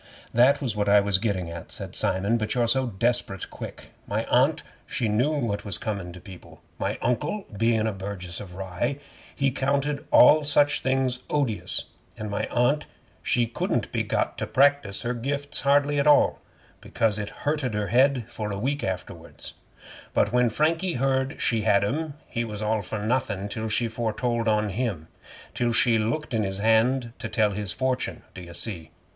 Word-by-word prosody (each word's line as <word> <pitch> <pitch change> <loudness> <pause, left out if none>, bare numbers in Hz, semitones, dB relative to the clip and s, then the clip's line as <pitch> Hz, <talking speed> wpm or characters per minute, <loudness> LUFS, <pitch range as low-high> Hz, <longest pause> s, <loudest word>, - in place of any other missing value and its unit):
'That 125 +4 +5
was 120 -5 -1
what 105 -1 0
I 105 0 +7
was 100 -1 +2
gettin' 100 -5 -1
at,' 85 0 -8
said - - -5
Simon, 100 +5 +1
'but 110 -1 -2
you're 120 -1 +2
so 130 +2 +2
desperate 115 -3 -1
quick. - - -9 0.2
My - - -1
Aunt - - +3 0.2
she 120 - -1
knew 115 +8 +2
what 115 -7 -2
was 100 - -1
comin' 100 -5 -4
to 90 - -10
people. 90 0 -13 0.2
My - - -1
Uncle 150 - -1
being 115 0 +2
a 110 - +1
burgess 95 -3 -6
of 95 -4 -9
Rye, 95 +8 -2 0.4
he 135 -1 +1
counted 140 +2 0
all 150 +5 +7
such 145 0 +3
things 130 -1 +1
odious, 135 -8 0 0.3
and 105 -1 -5
my 100 - -1
Aunt 140 +5 +1 0.3
she 120 -1 +2
couldn't 115 - -2
be - - 0
got - - -1
to - - -2
practise 140 -7 +2
her 120 - -1
gifts 140 +4 -2
hardly 145 +1 +3
at 140 - +2
all, 150 - +5 0.4
because 110 -2 0
it 105 - -4 0.2
hurted 145 -6 0
her 105 -2 -1
head 130 +1 +3
for 110 -3 -5
a 100 - -3
week 140 +7 -1
after 90 -1 -3
wards; - - -10 0.6
but 105 +2 +2
when 125 -1 +4
Frankie 165 - +1
heard 135 +2 0
she 115 -3 +1
had 105 -2 +3
'em, 145 +7 -2
he 115 - -2
was 105 -2 -5
all 110 0 +1
for 105 +3 -4
nothin' 110 -5 -1
till 110 +1 -4
she 115 +2 +1
foretold 115 +1 -1
on 105 -1 +2
him 95 -7 -3 0.4
till 120 -1 0
she 115 -1 +3
looked 120 +7 -2
in 110 - +2
his 95 -2 -2
hand 115 +3 +2
to 115 - -5
tell 105 -1 +2
his 100 -2 -3
fortune, 130 +4 -2
d'ye 90 -2 -9
see? 85 -4 -5
115 Hz, 185 wpm, -26 LUFS, 105-135 Hz, 0.6 s, I